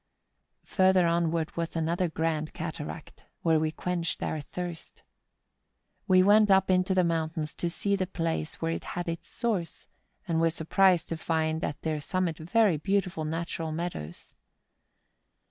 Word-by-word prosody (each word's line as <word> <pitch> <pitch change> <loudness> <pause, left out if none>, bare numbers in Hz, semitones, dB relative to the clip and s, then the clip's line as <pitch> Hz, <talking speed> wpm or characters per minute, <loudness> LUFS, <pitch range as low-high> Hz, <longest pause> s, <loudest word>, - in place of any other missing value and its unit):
Further 185 -2 +4
onward 170 -1 0
was 170 0 -3
another 170 +2 0
grand 160 -1 -1
cataract, 160 -1 -7 0.2
where 160 -2 +4
we 155 0 +1
quenched 175 0 -2
our 155 - -2
thirst. 175 +3 -7 1.0
We 185 -2 +6
went 210 +2 +6
up 190 -1 +5
into 185 +1 +2
the 185 - +4
moun¬ 165 -2 0
tains 155 -1 -3
to 175 - -1
see 200 +4 0
the 185 -2 -1
place 165 -3 -2
where 165 0 -1
it - - -3
had 175 - -2
its 165 0 -4
source, 205 -8 -3 0.4
and 165 -1 +1
were 165 - +4
surprised 175 +2 +3
to 165 - -2
find 160 0 -1
at 145 - -3
their 155 -1 -1
summit 175 +1 -1
very 185 +2 +3
beautiful 180 -1 -1
natural 165 0 -3
meadows. 155 - -5
165 Hz, 150 wpm, -28 LUFS, 160-185 Hz, 1.0 s, We